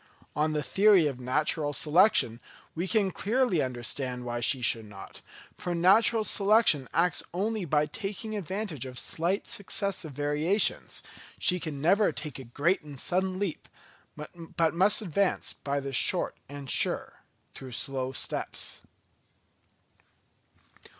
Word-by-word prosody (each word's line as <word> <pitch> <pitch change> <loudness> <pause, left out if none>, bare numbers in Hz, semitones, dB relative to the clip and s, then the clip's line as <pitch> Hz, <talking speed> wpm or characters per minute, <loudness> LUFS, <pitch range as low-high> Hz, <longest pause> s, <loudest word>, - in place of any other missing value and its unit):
On 155 +1 +1
the 150 -1 -1
theory 195 -2 +4
of 135 -4 -2
natural 145 +3 0
selection, 150 - +3 0.3
we 175 +3 -3
can 200 -2 +1
clearly 215 - +1
understand 125 0 -4
why 120 0 -3
she 130 +3 +2
should 115 -2 +3
not; 100 -2 -12 0.3
for 175 -1 -4
natural 215 +6 +4
selection 200 - +3
acts 175 +1 +2
only 210 +1 -1
by 150 -1 +2
taking 210 +6 -5
advantage 190 - -4
of 125 -1 -9
slight 175 +9 -1
successive 200 -5 -1
variations; 150 +8 0 0.3
she 180 -1 +3
can 155 -4 -5
never 195 +8 +3
take 150 -4 -6
a - - -8
great 145 +10 0
and 145 -4 -9
sudden 185 +3 0
leap, 195 -4 -4 0.5
but 165 +1 -3
must 195 +5 +3
advance 195 +1 0
by 140 0 -3
the 140 0 -6
short - - +2
and 140 -1 -7
sure, - - 0 0.3
though 130 - -9
slow 130 +1 -3
steps. - - -3
160 Hz, 130 wpm, -28 LUFS, 140-195 Hz, 0.5 s, theory